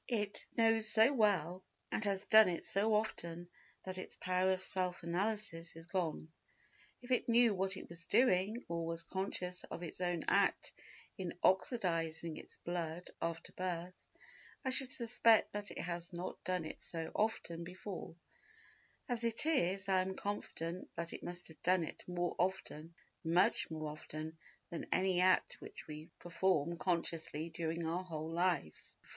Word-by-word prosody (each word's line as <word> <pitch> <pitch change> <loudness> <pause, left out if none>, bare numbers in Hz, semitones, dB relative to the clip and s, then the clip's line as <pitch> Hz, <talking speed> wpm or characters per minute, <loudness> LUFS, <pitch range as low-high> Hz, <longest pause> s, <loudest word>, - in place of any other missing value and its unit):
It 210 -4 0
knows 225 -1 +5
so 225 +5 +7
well 190 - +2 0.3
and - - 0
has 195 -1 +1
done 220 -3 +8
it 170 - -3
so 210 +2 +2
often 175 -5 -2 0.4
that 185 0 -5
its - - -6
power 185 +1 +1
of 185 0 +1
self 180 -2 0
analysis 175 -2 -1
is 165 0 -10
gone. 165 -3 -2 0.7
If 245 - -9
it 250 - +2
knew 235 -1 +6
what 190 0 -1
it - - -8
was 165 0 -9
doing, 215 +1 +3
or 170 0 -2
was 165 0 -3
conscious 180 0 -3
of 175 - -7
its 170 +2 -7
own 175 -2 0
act - - +2 0.5
in 180 -2 -4
oxidising 170 -5 +1
its - - -10
blood 175 0 -4
after 165 0 -3
birth, 180 -1 -3 0.7
I 260 - +1
should 260 -1 +5
suspect 230 -2 +4
that 205 0 -3
it - - -9
had 170 0 -3
not 175 +1 -6
done 180 -3 -1
it - - -7
so 165 -1 -5
often 170 -6 -1
before; 180 0 -7 0.9
as 240 -3 +2
it 230 +4 +1
is 195 - +2
I 190 -1 +4
am 190 +1 -3
confident 185 -4 -4
that 170 0 -4
it - - -7
must 175 0 -4
have 160 - -16
done 180 -1 +3
it - - -7
more 175 -1 -1
often—much 170 -1 0
more 155 -1 -4
often—than 155 +2 -8
any 185 -1 +3
act 185 0 +3
which - - -9
we 155 +1 -8
perform 170 -2 +1
consciously 165 -2 -1
during 165 0 -2
our 170 +3 -1
whole 160 -3 -5
lives. 170 - -1
180 Hz, 155 wpm, -36 LUFS, 165-200 Hz, 0.9 s, done